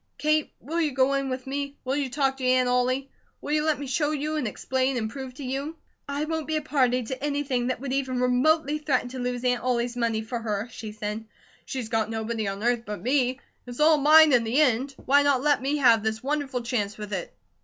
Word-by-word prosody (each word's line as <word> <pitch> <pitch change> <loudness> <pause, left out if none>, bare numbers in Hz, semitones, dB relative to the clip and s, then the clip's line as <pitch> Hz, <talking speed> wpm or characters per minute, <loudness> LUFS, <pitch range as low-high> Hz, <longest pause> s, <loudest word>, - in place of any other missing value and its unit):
Kate, 305 0 +1
will 325 +6 -2
you 310 - +2
go 265 +1 +3
in 275 -1 -1
with 255 0 -4
me? 280 +1 -4
Will 260 +1 0
you 285 -2 -1
talk 270 0 0
to 265 - -7
Aunt 255 0 +3
Ollie? 255 +2 0 0.3
Will 290 - -6
you 300 0 +2
let 310 -1 +1
me 285 - -6
show 290 +3 0
you, 305 +1 -2
and 295 -6 -1
explain, 260 +4 -1
and 220 -2 -2
prove 265 -1 -7
to 280 - -8
you?" 275 +5 -3 0.3
"I 285 +2 -1
won't 320 -2 -3
be 315 - -1
a 310 - 0
party 255 -4 +1
to 260 +4 -6
anything 280 -4 -1
that 255 - -2
would 265 0 -4
even 260 -2 -1
remotely 290 +5 +2
threaten 270 -5 0
to 260 +1 -7
lose 245 0 -3
Aunt 245 -1 +1
Ollie's 245 -1 -1
money 230 -2 0
for 235 +2 -4
her," 215 -1 -3
she 220 -1 -7
said. 210 +1 -5 0.4
"She's 250 -4 -5
got 220 -1 0
nobody 220 -1 -3
on 195 +2 -4
earth 240 0 +2
but 210 -4 -6
me. 255 +4 +1 0.3
It's 245 +2 -8
all 305 0 +5
mine 305 +1 +7
in 240 -2 +5
the 230 +5 +1
end. 270 -1 +2
Why 285 +2 +5
not 280 -2 +2
let 295 -2 +3
me 280 +3 0
have 235 -6 +5
this 220 +1 -2
wonderful 275 -3 -2
chance 215 -4 -2
with 210 -1 -7
it? 185 -3 -4
255 Hz, 235 wpm, -26 LUFS, 240-285 Hz, 0.4 s, mine